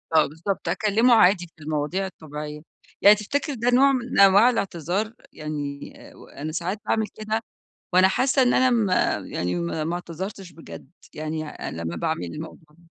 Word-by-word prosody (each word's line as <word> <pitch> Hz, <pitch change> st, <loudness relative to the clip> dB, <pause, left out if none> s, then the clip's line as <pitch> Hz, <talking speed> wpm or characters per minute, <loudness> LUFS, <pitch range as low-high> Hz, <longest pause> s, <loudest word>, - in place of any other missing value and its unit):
آه 155 Hz, -, +6 dB
بالضبط، 165 Hz, +7 st, -4 dB
أكلّمه 225 Hz, +4 st, +3 dB
عادي، 180 Hz, -4 st, +4 dB
في 155 Hz, -, -15 dB
المواضيع 155 Hz, +5 st, -2 dB
الطبيعيّة. 150 Hz, -4 st, -8 dB, 0.4 s
يعني 205 Hz, +1 st, +8 dB
تفتكر 280 Hz, +8 st, -2 dB
ده 240 Hz, 0 st, 0 dB
نوع 265 Hz, +3 st, +5 dB
من 255 Hz, -4 st, -1 dB
أنواع 200 Hz, +4 st, +7 dB
الاعتذار؟ 195 Hz, -, -2 dB, 0.2 s
يعني 145 Hz, -2 st, -6 dB, 0.2 s
آآ، -, -, -18 dB
و -, -, -15 dB
أنا 155 Hz, +2 st, -6 dB
ساعات 180 Hz, +6 st, -3 dB
باعمل 220 Hz, -1 st, 0 dB
كده 215 Hz, +1 st, -3 dB, 0.5 s
وأنا 185 Hz, +1 st, +6 dB
حاسّة 260 Hz, +6 st, +2 dB
إن 245 Hz, -, +3 dB
أنا 255 Hz, 0 st, +4 dB
م 225 Hz, -4 st, +2 dB, 0.4 s
يعني 90 Hz, 0 st, -2 dB
ما 85 Hz, -, -2 dB
ما 170 Hz, -, -2 dB
اعتذرتش 180 Hz, +2 st, -7 dB
بجد، 160 Hz, +1 st, -12 dB, 0.2 s
يعني 155 Hz, 0 st, -4 dB
أنا 85 Hz, -, -6 dB
لمّا 85 Hz, +1 st, -4 dB
باعمل 85 Hz, +1 st, -2 dB
الموضوع 150 Hz, -, -9 dB
180 Hz, 165 wpm, -24 LUFS, 155-215 Hz, 0.5 s, يعني